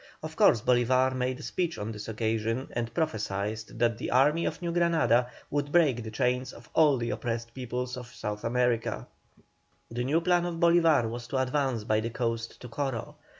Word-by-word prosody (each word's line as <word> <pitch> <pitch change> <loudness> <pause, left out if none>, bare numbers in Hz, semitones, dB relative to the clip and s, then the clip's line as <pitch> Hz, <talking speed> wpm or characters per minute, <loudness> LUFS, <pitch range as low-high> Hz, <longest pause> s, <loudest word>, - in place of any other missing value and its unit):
Of 155 0 -6
course 115 -7 +5
Bolívar 130 +1 +3
made 130 0 -1
a - - -9
speech 175 -3 -2
on 105 +2 -4
this 105 -1 -7
occasion, 115 +3 -1
and 120 -1 -3
prophesied 105 -6 -2 0.2
that 115 -1 +1
the - - -3
Army 150 +6 +3
of - - -2
New 170 -1 -2
Granada 160 -9 +3 0.2
would 145 0 -1
break 150 -8 +3
the 110 - -6
chains 125 +3 -1
of 115 -2 -14
all 150 -4 +5
the 120 0 -2
oppressed 115 0 -3
peoples 125 0 -4
of 125 -1 -8
South 105 -3 -5
America. 120 -1 0 0.9
The 120 +1 -2
new 145 +6 +2
plan 175 0 +2
of 175 - -3
Bolívar 165 -6 +4
was 120 +1 -6
to 135 - -2
advance 130 -3 0
by 110 0 +1
the 115 +1 -2
coast 115 -1 -3
to 125 - -7
Coro. 125 -1 -3
125 Hz, 190 wpm, -28 LUFS, 115-145 Hz, 0.9 s, course